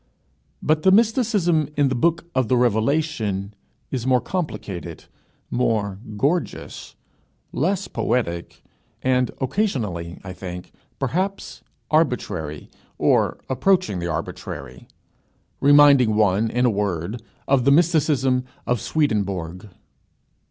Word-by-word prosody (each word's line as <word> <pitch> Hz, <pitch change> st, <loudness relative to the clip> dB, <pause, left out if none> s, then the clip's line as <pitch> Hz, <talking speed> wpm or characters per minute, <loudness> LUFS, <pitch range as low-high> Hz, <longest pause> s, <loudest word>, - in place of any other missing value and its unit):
But 155 Hz, 0 st, +2 dB
the 190 Hz, -, +4 dB
mysticism 210 Hz, -, +2 dB
in 145 Hz, -2 st, +3 dB
the -, -, 0 dB
Book 165 Hz, +7 st, +1 dB
of 130 Hz, -3 st, +1 dB
the 125 Hz, -, +2 dB
Revelation 115 Hz, -4 st, 0 dB, 0.4 s
is 130 Hz, -2 st, -3 dB
more 130 Hz, -1 st, +4 dB
complicated, 100 Hz, -, -5 dB, 0.5 s
more 105 Hz, -5 st, 0 dB, 0.2 s
gorgeous, 155 Hz, +10 st, -2 dB, 0.6 s
less 185 Hz, +6 st, 0 dB
poetic, 85 Hz, -8 st, -2 dB, 0.4 s
and 130 Hz, -1 st, +2 dB
occasionally, 115 Hz, -, -2 dB
I 95 Hz, -1 st, -7 dB
think, 90 Hz, -1 st, -8 dB, 0.3 s
perhaps 185 Hz, +9 st, -3 dB, 0.3 s
arbitrary, 100 Hz, -, -1 dB, 0.3 s
or -, -, +2 dB
approaching 130 Hz, -, +1 dB
the 85 Hz, -, -3 dB
arbitrary; 70 Hz, -5 st, -6 dB, 0.7 s
reminding 140 Hz, -5 st, +6 dB
one, 105 Hz, +1 st, +2 dB
in 125 Hz, +2 st, +1 dB
a 120 Hz, -, +4 dB
word, 100 Hz, +1 st, -2 dB, 0.3 s
of 135 Hz, -2 st, +3 dB
the 140 Hz, -, +4 dB
mysticism 145 Hz, -5 st, +3 dB, 0.2 s
of 120 Hz, -4 st, 0 dB
Swedenborg. 100 Hz, -, -1 dB
125 Hz, 105 wpm, -22 LUFS, 100-155 Hz, 0.7 s, reminding